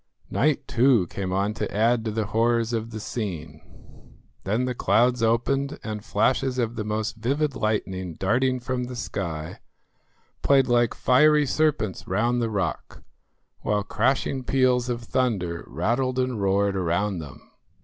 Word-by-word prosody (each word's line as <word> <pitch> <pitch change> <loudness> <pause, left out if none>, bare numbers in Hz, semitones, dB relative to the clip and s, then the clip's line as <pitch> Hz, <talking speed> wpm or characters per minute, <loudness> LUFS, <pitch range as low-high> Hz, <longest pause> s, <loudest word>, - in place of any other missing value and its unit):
Night 150 +2 +1
too 120 -5 +4
came 95 -2 -3
on 100 +3 0
to 105 -1 -4
add 115 +2 +2
to 110 - -2
the 110 0 -1
horrors 115 +2 +1
of 115 0 -2
the 110 -1 -6
scene. 95 -8 -5 0.8
Then 110 +6 0
the 125 - -1
clouds 120 +1 +2
opened 135 +5 +1
and 105 -2 -5
flashes 130 +3 +1
of 120 -2 -1
the 110 - -3
most 105 0 -3
vivid 140 +6 0
lightning 95 -5 -2
darting 125 +8 +1
from 125 0 -3
the 125 0 -7
sky 85 -9 -5 0.8
played 135 -2 +4
like 120 -2 +2
fiery 150 +3 +4
serpents 135 -9 0
round 120 +6 +1
the 115 - 0
rock, 100 -6 -3 0.6
while 105 -1 0
crashing 130 +5 0
peals 125 -1 +2
of 120 -1 -3
thunder 100 -10 -1
rattled 120 - -1
and 125 -4 -1
roared 100 0 +2
around 95 +1 0
them. 70 -3 -11
115 Hz, 150 wpm, -25 LUFS, 100-125 Hz, 0.8 s, too